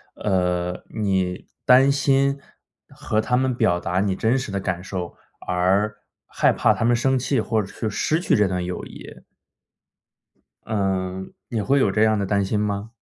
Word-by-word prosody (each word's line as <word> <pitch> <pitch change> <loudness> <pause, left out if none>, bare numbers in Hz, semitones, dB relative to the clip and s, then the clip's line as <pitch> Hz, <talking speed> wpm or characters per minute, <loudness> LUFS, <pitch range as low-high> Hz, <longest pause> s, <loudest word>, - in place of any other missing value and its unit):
呃， 90 -2 -1
你 95 -4 -1 0.2
担 130 +2 +6
心 140 0 +2 0.5
和 110 - -2
他 125 +3 0
们 130 -1 +1
表 90 -8 +2
达 90 +1 -1
你 100 -2 0
真 115 +6 +1
实 125 -5 -4
的 100 - -2
感 95 -2 -3
受， 90 -3 -5 0.3
而 95 +4 +1 0.3
害 - - +2
怕 - - +3
他 115 - -1
们 120 +1 +4
生 130 +2 +1
气 130 -1 0
或 110 0 0
者 95 - -7
是 110 - -4
失 155 +10 0
去 175 - +2
这 105 -2 +3
段 90 -1 -2
友 90 0 -5
谊。 - - -12 1.4
嗯， 95 -2 -2 0.2
也 110 -3 -2
会 140 +5 +2
有 100 - +2
这 105 +2 +2
样 110 -1 +3
的 100 - -1
担 100 0 +1
心 105 +2 -1
吗？ 105 +2 -3
105 Hz, 190 characters per minute, -23 LUFS, 95-120 Hz, 1.4 s, 担